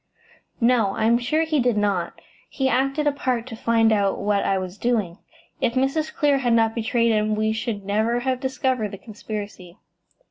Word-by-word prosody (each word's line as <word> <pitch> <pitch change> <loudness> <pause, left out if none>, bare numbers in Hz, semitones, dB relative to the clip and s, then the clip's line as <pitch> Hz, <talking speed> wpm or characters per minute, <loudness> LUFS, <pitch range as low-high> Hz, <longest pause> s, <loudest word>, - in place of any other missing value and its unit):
"No; 230 -5 +2
I - - 0
am 235 +1 +4
sure 305 +6 0
he 315 -2 0
did 245 -3 +1
not. 200 -4 -1 0.3
He 265 -2 -1
acted 275 +3 +1
a 295 - +3
part 255 -4 -2
to 250 -3 -8
find 225 0 +2
out 200 -2 +1
what 200 0 0
I 195 - +1
was 185 +1 -6
doing. 215 -7 -1 0.4
If 235 - +1
Mrs. 275 +4 0
Clear 285 -2 +2
had 245 -3 +1
not 225 -1 +3
betrayed 230 0 +1
him 215 0 +1
we 215 0 0
should 220 -3 -4
never 220 +4 0
have 260 0 -1
discovered 260 -4 -1
the 200 - -8
conspiracy." 205 -4 -8
230 Hz, 185 wpm, -23 LUFS, 210-260 Hz, 0.4 s, am